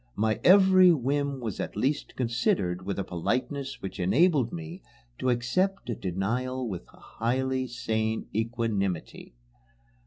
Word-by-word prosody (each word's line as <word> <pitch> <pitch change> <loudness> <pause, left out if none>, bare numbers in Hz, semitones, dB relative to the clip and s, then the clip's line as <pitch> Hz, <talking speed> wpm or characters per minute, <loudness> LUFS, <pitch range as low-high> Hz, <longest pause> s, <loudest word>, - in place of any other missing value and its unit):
My 110 +1 0
every 185 -1 +7
whim 140 -1 0
was 110 -5 -4
at - - -4
least 135 +8 -1
considered 115 -7 0
with 100 - -2
a 100 - -1
politeness 130 - -3
which 95 +1 -6
enabled 130 - +3
me 85 +2 -7 0.4
to 130 - 0
accept 125 +8 0
a - - -2
denial 120 +8 -2
with 95 -5 -6
a - - -20
highly 130 +2 -2
sane 110 -2 -2
equanimity. 110 - -2
120 Hz, 130 wpm, -27 LUFS, 100-135 Hz, 0.4 s, every